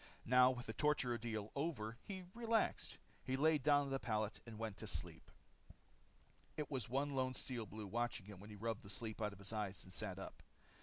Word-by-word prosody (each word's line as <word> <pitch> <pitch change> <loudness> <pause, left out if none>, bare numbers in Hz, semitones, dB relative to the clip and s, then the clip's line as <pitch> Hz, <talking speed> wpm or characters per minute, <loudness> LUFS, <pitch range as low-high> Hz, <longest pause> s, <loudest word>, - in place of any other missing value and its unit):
Now 125 +1 +8
with 125 -2 -2
the 110 - -3
torture 150 -3 +3
ordeal 110 -2 -2
over, 135 -7 -1
he 190 -2 -4
relaxed. 230 -1 +1 0.3
He 130 - 0
laid 155 +1 +5
down 145 +1 +6
on 140 - -2
the 135 - +1
pallet 110 -2 0
and 110 -2 -7
went 110 -3 -3
to - - -5
sleep. - - -2 1.3
There 150 - -1
was 130 -7 -1
one 140 +3 +1
lone 130 -1 +1
Steel 120 -5 -2
Blue 105 +2 -6
watching 120 0 -1
him 100 -2 -9
when 100 +2 -10
he 105 - -7
rubbed 110 +1 -2
the 100 - -11
sleep 115 -1 -3
out 105 -1 +1
of 100 - -10
his 100 +2 -6
eyes 105 -3 -2
and 95 - -11
sat 95 -1 -2
up. 95 - -7
115 Hz, 210 wpm, -41 LUFS, 105-135 Hz, 1.3 s, Now